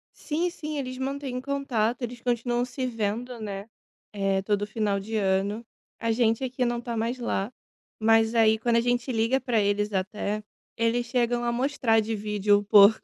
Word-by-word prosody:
Sim 335 Hz, +3 st, -1 dB
sim, 305 Hz, -4 st, -6 dB
eles 255 Hz, -2 st, -4 dB
mantêm 265 Hz, -1 st, -3 dB
contato. 260 Hz, -4 st, -1 dB
Eles 240 Hz, 0 st, -5 dB
continuam 240 Hz, 0 st, 0 dB
se 255 Hz, +1 st, -4 dB
vendo, 230 Hz, +1 st, -3 dB
né. 200 Hz, 0 st, -6 dB, 0.4 s
Eh, 195 Hz, -1 st, +1 dB
todo 205 Hz, +1 st, 0 dB
final 210 Hz, -2 st, 0 dB
de 220 Hz, +3 st, -5 dB
ano, 200 Hz, +3 st, 0 dB, 0.3 s
a 230 Hz, -, 0 dB
gente 225 Hz, +1 st, +2 dB
aqui 255 Hz, 0 st, -1 dB
não 240 Hz, 0 st, -1 dB
tá 235 Hz, -1 st, -4 dB
mais 230 Hz, +3 st, -1 dB
lá. 230 Hz, -2 st, -2 dB, 0.5 s
Mas, 225 Hz, 0 st, +4 dB
aí 220 Hz, -1 st, +5 dB
quando 230 Hz, +1 st, +1 dB
a 235 Hz, -, +4 dB
gente 245 Hz, +2 st, 0 dB
liga 230 Hz, +3 st, +2 dB
pra 245 Hz, -4 st, +1 dB
eles 205 Hz, +1 st, 0 dB
até, 205 Hz, +2 st, -2 dB, 0.3 s
eles 230 Hz, +1 st, +1 dB
chegam 240 Hz, -1 st, 0 dB
a 235 Hz, -, +1 dB
mostrar 245 Hz, -3 st, +2 dB
de 220 Hz, +1 st, -2 dB
vídeo 205 Hz, 0 st, +2 dB
o 205 Hz, -, -2 dB
porco. 205 Hz, +1 st, +7 dB
230 Hz, 180 wpm, -26 LUFS, 210-245 Hz, 0.5 s, porco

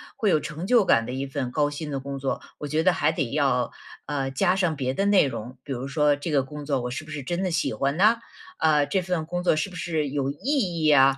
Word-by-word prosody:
会 210 Hz, -, +1 dB
有 155 Hz, -, +4 dB
成 155 Hz, +6 st, -6 dB
就 240 Hz, -5 st, +5 dB
感 115 Hz, -9 st, +4 dB
的 125 Hz, -, -5 dB
一 135 Hz, +1 st, -2 dB
份 135 Hz, -2 st, -3 dB
高 145 Hz, +1 st, +1 dB
薪 150 Hz, +1 st, -6 dB
的 135 Hz, -, -2 dB
工 140 Hz, +1 st, -5 dB
作， 135 Hz, 0 st, -2 dB, 0.2 s
我 150 Hz, -, -4 dB
觉 155 Hz, +2 st, 0 dB
得 185 Hz, 0 st, +4 dB
还 -, -, +2 dB
得 140 Hz, -7 st, -2 dB
要， 135 Hz, -4 st, +1 dB, 0.3 s
呃， 135 Hz, -2 st, -2 dB
加 180 Hz, +7 st, +2 dB
上 175 Hz, -4 st, +1 dB
别 130 Hz, -2 st, -1 dB
的 195 Hz, -, 0 dB
内 200 Hz, -5 st, +5 dB
容， 125 Hz, 0 st, -6 dB
比 140 Hz, -, -8 dB
如 130 Hz, +2 st, -4 dB
说 150 Hz, 0 st, +3 dB
这 150 Hz, +3 st, -5 dB
个 140 Hz, -3 st, +3 dB
工 150 Hz, +1 st, -8 dB
作 140 Hz, -3 st, 0 dB
我 125 Hz, -, -4 dB
是 130 Hz, -, -4 dB
不 155 Hz, -, -11 dB
是 145 Hz, -3 st, -5 dB
真 175 Hz, +6 st, -2 dB
的 185 Hz, -, 0 dB
喜 160 Hz, -, 0 dB
欢 140 Hz, +2 st, -1 dB
呢？ 215 Hz, +5 st, +5 dB, 0.4 s
呃， 150 Hz, -2 st, +3 dB
这 185 Hz, +6 st, 0 dB
份 175 Hz, -3 st, -2 dB
工 175 Hz, +2 st, -3 dB
作 180 Hz, -, +3 dB
是 155 Hz, +5 st, -1 dB
不 180 Hz, -, -12 dB
是 160 Hz, -3 st, -1 dB
有 140 Hz, -1 st, -1 dB
意 180 Hz, -, -1 dB
义 -, -, +5 dB
啊？ 135 Hz, -1 st, +6 dB
150 Hz, 290 characters per minute, -25 LUFS, 135-175 Hz, 0.4 s, 啊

